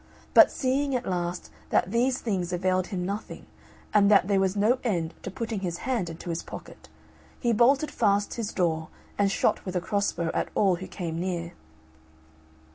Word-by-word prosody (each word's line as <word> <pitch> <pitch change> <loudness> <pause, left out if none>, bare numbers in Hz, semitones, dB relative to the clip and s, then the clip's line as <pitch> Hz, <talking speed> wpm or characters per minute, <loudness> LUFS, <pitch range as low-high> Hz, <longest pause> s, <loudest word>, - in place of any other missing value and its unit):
But - - +9
seeing, 270 +1 0
at 245 - -2
last, 175 -1 -3 0.2
that 185 - +2
these 250 +3 +2
things 185 -6 -2
availed 185 +1 0
him 180 -3 -3
nothing; 200 +3 -5 0.5
and 205 -1 +5
that 200 -3 +5
there 200 -1 +3
was 190 0 +1
no 220 +5 +3
end 175 -8 -1
to - - -5
putting 220 +2 -4
his 175 -3 -3
hand 235 -10 0
into 165 +1 -6
his 165 - -2
pocket, - - -11 0.5
he 240 -2 +1
bolted 270 +7 +3
fast 205 -2 +1
his 230 -3 -3
door, 160 -3 0 0.3
and 200 -1 +3
shot - - +1
with 185 -1 -5
a - - +3
cross 200 +3 0
bow 170 -1 -2
at - - -1
all 190 -4 +3
who 185 - -7
came 165 -3 -4
near. 175 -2 -3
195 Hz, 185 wpm, -27 LUFS, 175-225 Hz, 0.5 s, But